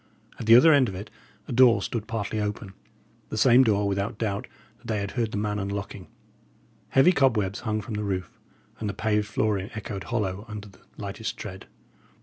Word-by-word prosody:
At 110 Hz, -, -5 dB
the 115 Hz, -, +9 dB
other 155 Hz, +6 st, +8 dB
end 135 Hz, -5 st, +4 dB
of 95 Hz, -, -7 dB
it, 100 Hz, +3 st, -8 dB, 0.4 s
a -, -, -6 dB
door 125 Hz, -1 st, +6 dB
stood 110 Hz, -3 st, -4 dB
partly 110 Hz, -1 st, -3 dB
open; 105 Hz, -1 st, -4 dB, 0.6 s
the -, -, -4 dB
same 125 Hz, +3 st, +6 dB
door, 105 Hz, -4 st, +2 dB
without 100 Hz, +3 st, -2 dB
doubt, 105 Hz, -3 st, -2 dB, 0.3 s
that 120 Hz, -, -15 dB
they 110 Hz, -3 st, 0 dB
had 100 Hz, -1 st, -3 dB
heard 115 Hz, -3 st, -1 dB
the -, -, -3 dB
man 105 Hz, 0 st, -1 dB
unlocking. 100 Hz, -1 st, -5 dB, 0.8 s
Heavy 135 Hz, +7 st, +5 dB
cobwebs 110 Hz, -, +1 dB
hung 110 Hz, -2 st, -2 dB
from 105 Hz, +3 st, -7 dB
the 105 Hz, 0 st, -2 dB
roof; 95 Hz, -3 st, -4 dB, 0.4 s
and 105 Hz, -, -2 dB
the 100 Hz, -, -5 dB
paved 105 Hz, -1 st, 0 dB
flooring 105 Hz, -2 st, -1 dB
echoed 100 Hz, -3 st, -5 dB
hollow 100 Hz, -4 st, -2 dB
under 105 Hz, -1 st, -7 dB
the 95 Hz, -, -20 dB, 0.2 s
lightest 105 Hz, +2 st, -5 dB
tread. 95 Hz, -4 st, -8 dB
105 Hz, 190 wpm, -26 LUFS, 100-115 Hz, 0.8 s, the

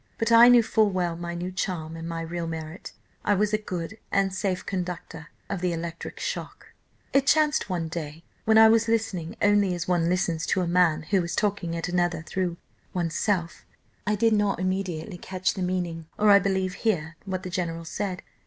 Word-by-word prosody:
But 225 Hz, 0 st, 0 dB
I 230 Hz, +1 st, +9 dB
knew 245 Hz, -1 st, +7 dB
full 220 Hz, -1 st, +3 dB
well 180 Hz, -3 st, -1 dB
my 170 Hz, 0 st, -5 dB
new 180 Hz, +2 st, -4 dB
charm 170 Hz, -4 st, -3 dB
and 165 Hz, +1 st, -6 dB
my 165 Hz, 0 st, -3 dB
real 165 Hz, +1 st, -4 dB
merit; 160 Hz, +2 st, -6 dB, 0.3 s
I 205 Hz, -, +3 dB
was 210 Hz, +2 st, +1 dB
a -, -, +4 dB
good 185 Hz, +1 st, -5 dB
and 195 Hz, -1 st, +2 dB
safe 190 Hz, -1 st, -2 dB
conductor 175 Hz, -4 st, -5 dB, 0.2 s
of 195 Hz, -3 st, -4 dB
the 180 Hz, -1 st, 0 dB
electric 165 Hz, 0 st, -6 dB
shock. -, -, -5 dB, 0.4 s
"It 275 Hz, 0 st, +3 dB
chanced 305 Hz, -6 st, +3 dB
one 170 Hz, -3 st, -1 dB
day, 160 Hz, -1 st, -6 dB, 0.2 s
when 220 Hz, 0 st, +5 dB
I 220 Hz, 0 st, +9 dB
was 225 Hz, +1 st, +4 dB
listening 210 Hz, -7 st, -1 dB
only 205 Hz, -3 st, +4 dB
as 175 Hz, -, -4 dB
one 175 Hz, -2 st, +2 dB
listens 175 Hz, -3 st, 0 dB
to 190 Hz, -, +1 dB
a 180 Hz, -, -1 dB
man 170 Hz, -3 st, +3 dB
who 185 Hz, +2 st, +1 dB
is 170 Hz, 0 st, -3 dB
talking 200 Hz, -6 st, -1 dB
at 165 Hz, -, -3 dB
another 175 Hz, -2 st, 0 dB
through 175 Hz, +1 st, -2 dB, 0.4 s
oneself, 170 Hz, +1 st, -1 dB, 0.4 s
I 210 Hz, -, +2 dB
did 225 Hz, +2 st, +3 dB
not 205 Hz, -1 st, +1 dB
immediately 185 Hz, -1 st, -2 dB
catch 185 Hz, 0 st, -1 dB
the 190 Hz, -, -5 dB
meaning, 175 Hz, -3 st, -2 dB
or 210 Hz, 0 st, +5 dB
I 200 Hz, -, +8 dB
believe 190 Hz, -1 st, 0 dB
hear 170 Hz, -7 st, 0 dB
what 190 Hz, -1 st, -3 dB
the 185 Hz, -, -6 dB
general 165 Hz, -2 st, -3 dB
said. 185 Hz, +2 st, -4 dB
180 Hz, 195 wpm, -26 LUFS, 170-205 Hz, 0.4 s, I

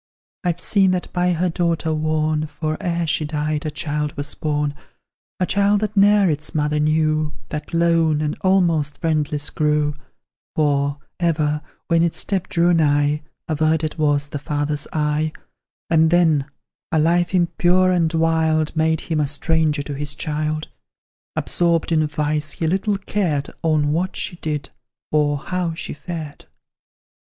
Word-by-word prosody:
I've 175 Hz, -1 st, 0 dB
seen 195 Hz, 0 st, +3 dB
that 180 Hz, -, -8 dB
by 180 Hz, 0 st, +2 dB
her 175 Hz, +2 st, 0 dB
daughter 165 Hz, -2 st, 0 dB
worn: 155 Hz, 0 st, 0 dB
For, 155 Hz, +1 st, -3 dB
ere 170 Hz, -1 st, -1 dB
she 155 Hz, 0 st, 0 dB
died, 150 Hz, 0 st, -2 dB
a -, -, 0 dB
child 150 Hz, -1 st, -3 dB
was 145 Hz, 0 st, -3 dB
born; 150 Hz, -1 st, -1 dB, 0.7 s
A 180 Hz, -, +2 dB
child 200 Hz, +2 st, +2 dB
that 215 Hz, 0 st, -2 dB
ne'er 205 Hz, 0 st, +5 dB
its 150 Hz, 0 st, -2 dB
mother 150 Hz, 0 st, +1 dB
knew, 155 Hz, 0 st, +1 dB, 0.2 s
That 150 Hz, -1 st, -5 dB
lone, 165 Hz, -2 st, +3 dB
and 150 Hz, -1 st, -1 dB
almost 170 Hz, -6 st, +2 dB
friendless 150 Hz, -2 st, -1 dB
grew; 150 Hz, -1 st, +1 dB, 0.6 s
For, 145 Hz, -2 st, +1 dB, 0.2 s
ever, 150 Hz, -3 st, +1 dB, 0.3 s
when 165 Hz, -2 st, +3 dB
its 170 Hz, -1 st, +1 dB
step 190 Hz, -2 st, -1 dB
drew 175 Hz, +1 st, +3 dB
nigh, 145 Hz, -2 st, +2 dB, 0.3 s
Averted 155 Hz, 0 st, 0 dB
was 145 Hz, -1 st, +1 dB
the 145 Hz, -, -4 dB
father's 145 Hz, 0 st, -2 dB
eye; 150 Hz, 0 st, 0 dB, 0.5 s
And 160 Hz, -1 st, +4 dB
then, 160 Hz, -5 st, +3 dB, 0.4 s
a 160 Hz, -, +2 dB
life 175 Hz, +4 st, +2 dB
impure 175 Hz, +1 st, +3 dB
and 170 Hz, -3 st, +2 dB
wild 160 Hz, -1 st, +1 dB
Made 160 Hz, 0 st, +1 dB
him 160 Hz, -2 st, -2 dB
a 150 Hz, -, +1 dB
stranger 155 Hz, 0 st, +1 dB
to 145 Hz, -, -5 dB
his 145 Hz, +1 st, -2 dB
child: 155 Hz, +1 st, -2 dB, 0.7 s
Absorbed 170 Hz, -1 st, +1 dB
in 155 Hz, -2 st, +3 dB
vice, 150 Hz, 0 st, -1 dB
he 165 Hz, -, -3 dB
little 195 Hz, +5 st, +1 dB
cared 180 Hz, -8 st, -1 dB
On 155 Hz, -3 st, +2 dB
what 180 Hz, +4 st, -1 dB
she 175 Hz, -, -3 dB
did, 150 Hz, -4 st, -4 dB, 0.4 s
or 150 Hz, -1 st, +2 dB
how 175 Hz, +2 st, -3 dB
she -, -, -5 dB
fared. 155 Hz, -2 st, -7 dB
155 Hz, 150 wpm, -21 LUFS, 150-170 Hz, 0.7 s, ne'er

